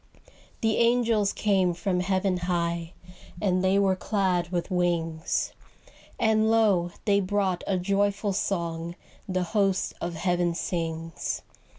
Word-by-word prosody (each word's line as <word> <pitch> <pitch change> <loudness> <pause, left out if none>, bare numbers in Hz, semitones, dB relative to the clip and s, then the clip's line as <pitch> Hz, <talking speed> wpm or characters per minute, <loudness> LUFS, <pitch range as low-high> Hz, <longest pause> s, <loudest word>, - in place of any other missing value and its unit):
The 220 -1 +2
angels 230 -3 +3
came 190 -4 +1
from 180 +1 -1
heaven 185 0 +1
high, 170 -1 -2 0.5
And 185 -3 +1
they 190 +1 +3
were 195 -1 +3
clad 185 -3 0
with 175 +1 -2
wings; 170 -3 0 0.7
And 220 0 +3
lo, 205 -6 +3 0.2
they 200 -1 +4
brought 190 -2 0
a 195 - +1
joyful 200 +2 0
song 170 -3 -2 0.3
The 185 -1 0
host 195 -3 +1
of 170 0 -3
heaven 175 0 0
sings. 165 -2 -3
185 Hz, 120 wpm, -27 LUFS, 175-200 Hz, 0.7 s, they